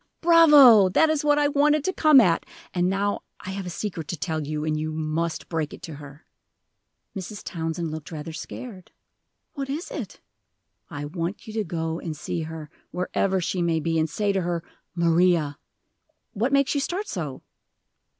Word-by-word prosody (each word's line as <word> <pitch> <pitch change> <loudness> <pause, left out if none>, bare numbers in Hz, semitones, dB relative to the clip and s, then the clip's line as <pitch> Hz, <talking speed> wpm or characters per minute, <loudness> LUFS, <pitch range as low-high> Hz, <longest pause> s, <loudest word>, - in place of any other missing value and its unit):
"Bravo! 295 - +8
that 315 - +4
is 305 -2 0
what 295 0 +3
I 295 0 +3
wanted 295 +1 +3
to 375 - -1
come 305 -5 +6
at. 180 -8 +3 0.3
And 180 0 +1
now 200 +1 0 0.2
I 190 - -7
have 190 -1 -5
a - - -3
secret 170 -2 -5
to 175 - -4
tell 160 0 -2
you, 150 0 -3
and 155 -1 0
you 155 +1 -2
must 160 +1 -2
break 160 -3 -3
it - - -19
to 165 -3 -7
her." 145 +2 -13 0.9
Mrs. 195 +2 -6
Townsend 165 -1 -3
looked 155 0 -7
rather 160 0 -6
scared. 195 +2 -8 0.6
"What 275 -2 -5
is 305 +6 -4
it?" - - -6 0.7
"I 145 0 -5
want 170 +5 -4
you 220 - -8
to 220 -1 -1
go 165 -2 -3
and 160 -3 -5
see 165 - -3
her, 155 -1 -7 0.2
wherever 190 +1 0
she 180 +1 -2
may 165 -2 +1
be, 165 +1 0
and 160 0 +1
say 205 +5 0
to 190 - 0
her, 170 -1 -2 0.3
'Maria,' 170 -3 +2 0.7
what 235 +4 0
makes 275 -1 +3
you 285 - 0
start 380 +8 -3
so?" 155 - -5
175 Hz, 180 wpm, -25 LUFS, 160-225 Hz, 0.9 s, Bravo